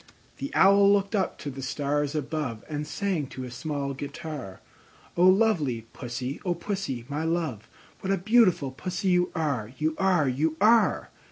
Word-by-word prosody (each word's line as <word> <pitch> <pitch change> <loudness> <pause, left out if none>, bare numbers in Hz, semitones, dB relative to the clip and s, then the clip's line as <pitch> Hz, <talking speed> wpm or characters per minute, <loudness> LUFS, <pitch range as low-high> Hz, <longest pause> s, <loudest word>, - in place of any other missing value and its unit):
The 280 - -5
Owl 200 +1 +6
looked 200 +1 +1
up 195 -3 0
to 145 - -6
the 135 +1 -8
stars 145 +2 -1
above, 140 -6 -3
And 150 -1 -4
sang 185 -6 -2
to 130 - -7
a 125 - -7
small 140 +2 -3
guitar, 140 - -7 0.6
"O 180 +1 +5
lovely 180 - +2
Pussy, 125 +2 -5
O 180 -2 0
Pussy, 170 - -4
my 150 +2 -3
love, 160 -10 -2 0.3
What 190 - -2
a 195 - +2
beautiful 190 - +3
Pussy 180 +7 -3
you 180 0 +2
are, 140 -9 -1
You 155 +1 0
are, 185 -6 +3
You 150 +5 0
are! 220 +2 +4
155 Hz, 165 wpm, -27 LUFS, 135-190 Hz, 0.6 s, Owl